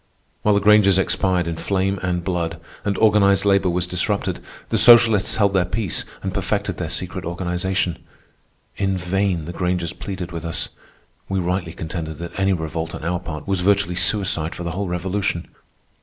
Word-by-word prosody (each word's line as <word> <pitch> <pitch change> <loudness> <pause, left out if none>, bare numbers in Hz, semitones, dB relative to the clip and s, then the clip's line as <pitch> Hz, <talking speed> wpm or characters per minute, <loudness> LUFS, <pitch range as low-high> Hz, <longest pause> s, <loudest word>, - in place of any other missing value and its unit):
While 105 -1 +3
the - - +4
Grangers 100 -2 +5
expired 95 -2 +1
in 85 -1 -3
flame 95 +2 0
and 90 -1 -1
blood, 85 -2 -2 0.2
and 100 -2 -1
organized 105 -2 +4
labor 100 -2 +3
was 90 0 0
disrupted, 90 +3 -1 0.3
the - - +1
socialists 115 -4 +6
held 100 -2 +2
their 95 -2 +3
peace 95 +1 -2 0.2
and 95 -1 -3
perfected 100 0 -1
their 85 -3 -3
secret 90 +2 -3
organization. 90 +1 -2 0.8
In 95 -1 0
vain 90 -2 -1
the 85 - -6
Grangers 90 -2 -1
pleaded 95 -3 -6
with 85 -1 -6
us. 85 -1 -2 0.6
We 95 - -1
rightly 90 -1 -2
contended 80 -1 -5
that 85 0 -6
any 95 0 +2
revolt 80 -2 -3
on - - -8
our 90 +1 -1
part 80 -4 -7
was 95 -2 0
virtually 100 -1 +2
suicide 90 -3 +1
for 90 - -6
the 85 - -3
whole 95 +3 -3
Revolution. 90 +1 -2
90 Hz, 170 wpm, -21 LUFS, 85-100 Hz, 0.8 s, socialists